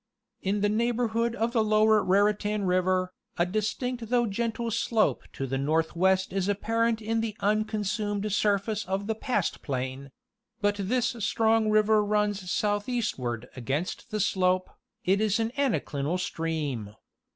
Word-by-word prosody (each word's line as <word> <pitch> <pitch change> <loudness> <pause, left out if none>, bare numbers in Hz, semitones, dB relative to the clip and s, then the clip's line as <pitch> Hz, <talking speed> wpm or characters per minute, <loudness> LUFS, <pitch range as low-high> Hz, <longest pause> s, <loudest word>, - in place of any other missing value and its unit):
In 200 +1 0
the 205 - +3
neighborhood 230 +1 0
of 230 0 0
the 230 -2 +2
lower 215 0 +4
Raritan 205 +2 +2
river, 185 0 +1 0.2
a 175 - +3
distinct 220 +4 -2
though 240 -1 +3
gentle 230 +2 -2
slope 225 0 +1
to 135 - -3
the 135 0 -2
northwest 170 +6 +1
is 195 -1 0
apparent 225 +2 0
in 225 +1 0
the 220 -2 -4
unconsumed 210 0 -1
surface 210 +1 +1
of 190 +2 -2
the 220 - 0
pastplain; 140 - -2 0.5
but 205 -1 +1
this 240 +5 0
strong 225 +1 +2
river 215 0 +4
runs 205 -3 0
southeastward 205 - -1
against 140 - -3
the 215 -2 -2
slope; 185 -2 +1 0.3
it 195 +3 +3
is 215 0 +2
an 225 0 0
anaclinal 180 - 0
stream. 150 - -3
205 Hz, 135 wpm, -27 LUFS, 185-225 Hz, 0.5 s, lower